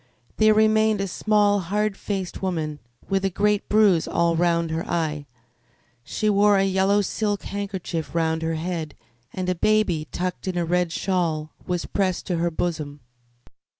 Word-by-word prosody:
There 215 Hz, 0 st, +5 dB
remained 220 Hz, -1 st, +3 dB
a 195 Hz, -, -1 dB
small, 205 Hz, +2 st, +2 dB
hard 205 Hz, +3 st, -1 dB
faced 195 Hz, -3 st, -4 dB
woman 160 Hz, -6 st, -2 dB, 0.3 s
with 195 Hz, 0 st, 0 dB
a 195 Hz, -, +2 dB
great 205 Hz, +2 st, 0 dB
bruise 205 Hz, -6 st, +4 dB
all 170 Hz, -1 st, +1 dB
round 170 Hz, -1 st, +1 dB
her 160 Hz, +1 st, -2 dB
eye. 150 Hz, -4 st, -2 dB, 0.8 s
She 215 Hz, -, -2 dB
wore 205 Hz, 0 st, +4 dB
a 195 Hz, -, +3 dB
yellow 195 Hz, +2 st, +2 dB
silk 205 Hz, 0 st, -2 dB
handkerchief 190 Hz, -5 st, -4 dB
round 160 Hz, -1 st, +1 dB
her 160 Hz, 0 st, -1 dB
head, 160 Hz, -2 st, -4 dB, 0.4 s
and 185 Hz, -1 st, -4 dB
a 185 Hz, -, +2 dB
baby, 180 Hz, -5 st, +1 dB
tucked 180 Hz, +1 st, -4 dB
in 185 Hz, -1 st, -2 dB
a 170 Hz, -, 0 dB
red 175 Hz, 0 st, +1 dB
shawl, 165 Hz, -4 st, -1 dB, 0.2 s
was 180 Hz, -2 st, -1 dB
pressed 185 Hz, -3 st, -1 dB
to 180 Hz, -, -1 dB
her 170 Hz, +1 st, +1 dB
bosom. 155 Hz, -4 st, -3 dB
185 Hz, 160 wpm, -24 LUFS, 165-205 Hz, 0.8 s, There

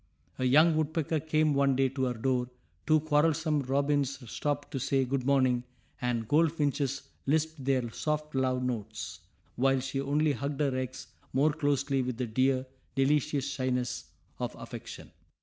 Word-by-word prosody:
A 130 Hz, -, +1 dB
young 155 Hz, +5 st, +6 dB
woodpecker 155 Hz, 0 st, 0 dB
came 155 Hz, 0 st, +2 dB
one 140 Hz, -1 st, +3 dB
day 135 Hz, +1 st, +3 dB
to 130 Hz, 0 st, -1 dB
her 125 Hz, -1 st, -1 dB
door; 125 Hz, +1 st, 0 dB, 0.4 s
two 155 Hz, -1 st, +5 dB
quarrelsome 155 Hz, 0 st, +2 dB
robins 140 Hz, +1 st, +1 dB
stopped 145 Hz, -1 st, -2 dB
to 135 Hz, -, -2 dB
say 135 Hz, +1 st, +1 dB
good 130 Hz, 0 st, -2 dB
morning; 130 Hz, -3 st, +3 dB, 0.4 s
and 120 Hz, -3 st, -1 dB
goldfinches 145 Hz, -3 st, +1 dB, 0.2 s
lisped 160 Hz, 0 st, 0 dB
their 130 Hz, -2 st, +1 dB
soft 150 Hz, +2 st, -2 dB
love 130 Hz, -1 st, +1 dB
notes, 110 Hz, -9 st, -4 dB, 0.4 s
while 135 Hz, +1 st, +3 dB
she 135 Hz, +1 st, -2 dB
only 145 Hz, +2 st, +2 dB
hugged 140 Hz, +1 st, -3 dB
her 140 Hz, -3 st, +1 dB
eggs 130 Hz, 0 st, -4 dB, 0.3 s
more 145 Hz, +3 st, +3 dB
closely 140 Hz, -2 st, +1 dB
with 125 Hz, -2 st, -3 dB
the 125 Hz, -, -1 dB
dear, 130 Hz, +3 st, +1 dB, 0.3 s
delicious 145 Hz, 0 st, +2 dB
shyness 130 Hz, -3 st, -2 dB, 0.3 s
of -, -, -3 dB
affection. -, -, -9 dB
135 Hz, 150 wpm, -30 LUFS, 130-150 Hz, 0.4 s, young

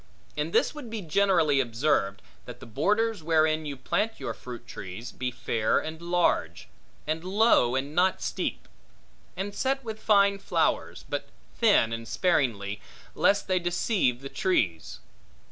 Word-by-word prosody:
And 150 Hz, +2 st, -2 dB
this -, -, +2 dB
would 295 Hz, -6 st, -8 dB
be 220 Hz, -3 st, -5 dB
generally 165 Hz, -4 st, +3 dB
observed, 115 Hz, -5 st, 0 dB, 0.2 s
that -, -, -9 dB
the -, -, -10 dB
borders 205 Hz, -, 0 dB
wherein 155 Hz, -1 st, +2 dB
you 140 Hz, -2 st, -5 dB
plant 210 Hz, +12 st, -1 dB
your -, -, -4 dB
fruit 120 Hz, -1 st, -9 dB
trees, 115 Hz, -1 st, -8 dB
be 125 Hz, 0 st, -3 dB
fair 115 Hz, -3 st, 0 dB
and 160 Hz, +1 st, -4 dB
large, 175 Hz, 0 st, 0 dB, 0.4 s
and 160 Hz, +2 st, -2 dB
low, 190 Hz, -, +3 dB
and 140 Hz, +3 st, -2 dB
not 185 Hz, +3 st, +2 dB
steep; -, -, -3 dB, 0.7 s
and 200 Hz, +2 st, -3 dB
set 270 Hz, +4 st, -1 dB
with 220 Hz, -2 st, -6 dB
fine 200 Hz, -2 st, +4 dB
flowers, -, -, -1 dB
but -, -, -4 dB, 0.3 s
thin 205 Hz, -, +4 dB
and 115 Hz, 0 st, -5 dB
sparingly, 115 Hz, -, 0 dB, 0.3 s
lest 200 Hz, 0 st, +2 dB
they 185 Hz, -1 st, +2 dB
deceive 175 Hz, -, 0 dB
the 135 Hz, -, -7 dB
trees. 100 Hz, -, -1 dB
160 Hz, 145 wpm, -27 LUFS, 125-200 Hz, 0.7 s, fine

